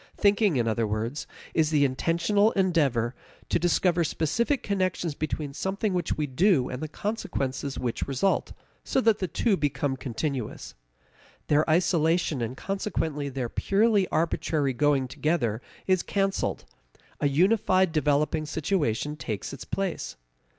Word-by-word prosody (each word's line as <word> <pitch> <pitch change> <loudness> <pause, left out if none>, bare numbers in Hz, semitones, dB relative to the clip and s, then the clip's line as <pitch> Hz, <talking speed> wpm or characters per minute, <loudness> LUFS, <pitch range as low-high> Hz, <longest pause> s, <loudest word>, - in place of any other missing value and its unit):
Thinking, 205 -3 +3
in 120 -2 +1
other 115 0 +1
words, 110 +7 -3 0.3
is 160 -2 +2
the 150 -2 +3
intentional 170 +10 +2
endeavor 145 - +2 0.4
to - - +2
discover 175 0 +2
specific 235 - 0
connections 185 -5 -1
between 150 -1 -3
something 195 +5 -1
which 180 -1 -1
we 150 - 0
do 145 0 +2
and 125 - -5
the 155 - -3
consequences 150 - -3
which 120 -2 -2
result, 140 +8 0 0.3
so - - +1
that 225 -4 +3
the 185 - -1
two 205 +5 +1
become 145 -4 -1
continuous. 130 -1 -4 0.8
Their 150 +2 +3
isolation, 165 -3 +2
and 120 +3 -3
consequently 160 -7 -2
their 130 -2 -3
purely 200 - +2
arbitrary 155 -3 0
going 140 0 +2
together, 130 -5 -1 0.2
is 185 -2 +3
canceled; 195 -1 -1 0.5
a - - +2
unified 185 +3 +3
developing 150 0 +1
situation 150 - -1
takes 110 -6 -5
its 140 - -8
place. 195 -3 -3
155 Hz, 135 wpm, -27 LUFS, 135-190 Hz, 0.8 s, Thinking